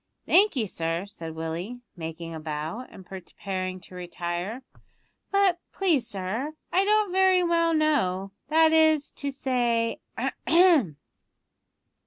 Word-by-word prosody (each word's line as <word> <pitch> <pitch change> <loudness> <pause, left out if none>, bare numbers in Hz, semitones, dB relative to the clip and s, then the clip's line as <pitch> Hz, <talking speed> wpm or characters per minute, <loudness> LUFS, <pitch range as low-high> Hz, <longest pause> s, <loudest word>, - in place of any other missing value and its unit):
"Thank 405 +1 +5
you, 235 -5 +1
sir," 165 -1 -3
said 165 -5 -8
Willie, 170 +9 -5
making 165 0 -6
a 160 - -6
bow, 155 +10 -5
and 190 - -13
preparing 185 0 -5
to 185 - -15
retire; 175 +6 -4 0.7
"but 395 -3 +3
please, 320 -11 +1
sir, 215 +11 -4 0.2
I 375 - +3
don't 420 -1 +2
very 375 -1 +4
well 335 -1 +2
know, 195 -12 +1 0.2
that 320 +1 +4
is 315 -2 +4
to 285 - -3
say 240 -4 0 0.2
ahem!" 325 - +3
235 Hz, 125 wpm, -26 LUFS, -, 0.7 s, Thank